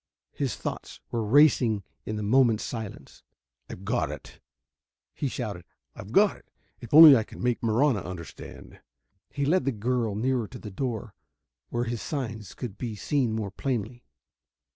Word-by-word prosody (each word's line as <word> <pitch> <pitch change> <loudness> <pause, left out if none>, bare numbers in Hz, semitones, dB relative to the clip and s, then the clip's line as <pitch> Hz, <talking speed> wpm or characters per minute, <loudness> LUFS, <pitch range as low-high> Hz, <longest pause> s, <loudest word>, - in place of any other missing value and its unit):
His - - -2
thoughts - - -6
were 115 -1 -1
racing 120 -4 +4 0.2
in 110 - -2
the 105 - -3
moment's 115 0 +3
silence. 110 -4 -7 0.5
"I've 95 - -9
got 110 - 0
it," 75 -1 -10 0.7
he 140 - -2
shouted. 105 -9 -5 0.3
"I've 100 - -10
got 200 - +4
it! - - -24 0.3
If 120 - -11
only 155 -1 +11
I 115 - +3
can 110 - -11
make 125 -1 0
Marahna 115 +1 +2
understand!" 85 -3 -10 0.5
He 140 -1 -2
led 165 +2 +2
the 135 - 0
girl 115 -1 -1
nearer 120 0 0
to 125 - -10
the 105 -3 -9
door, 115 0 -4 0.6
where 120 0 -1
his 120 -2 -3
signs 115 - -5
could 110 -5 -7
be 115 -4 -4
seen 125 +1 0
more 110 -3 -3
plainly. 120 0 -3
115 Hz, 160 wpm, -27 LUFS, 105-130 Hz, 0.7 s, only